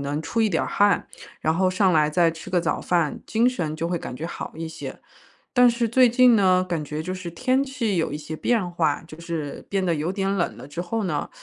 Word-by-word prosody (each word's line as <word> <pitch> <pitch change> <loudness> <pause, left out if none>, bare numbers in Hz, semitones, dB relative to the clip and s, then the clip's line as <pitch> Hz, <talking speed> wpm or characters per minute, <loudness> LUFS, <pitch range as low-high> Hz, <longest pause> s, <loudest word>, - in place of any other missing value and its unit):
能 145 +2 -2
出 230 +7 -2
一 215 - +3
点 165 - +1
儿 - - -3
汗。 205 -3 +2 0.3
然 160 - +1
后 185 +2 +2
上 185 0 +3
来 155 -1 +3
再 170 0 +3
吃 165 0 -10
个 180 -2 +2
早 165 - -1
饭， 170 -4 0
精 230 +3 +3
神 165 -11 -2
就 165 +2 -3
会 175 - -1
感 - - -7
觉 160 +6 -5
好 - - -6
一 165 0 -5
些。 160 - -8 0.5
但 250 -1 +6
是 235 0 0
最 250 +2 +5
近 245 0 +5
呢， 185 -3 +4
感 170 -3 -1
觉 150 +2 -4
就 185 - -4
是 185 -2 -6
天 255 +8 +1
气 250 -8 -2
有 160 - 0
一 145 - -3
些 155 +1 -7
变 215 +2 0
化， 165 -4 0
就 160 +1 -12
是 165 -4 -5
变 195 -1 0
得 170 -2 +1
有 155 +4 -2
点 195 0 -1
冷 175 -3 -1
了 - - -10
之 150 +4 -6
后 215 +5 -2
呢， 155 -6 -2
175 Hz, 270 characters per minute, -24 LUFS, 160-210 Hz, 0.5 s, 但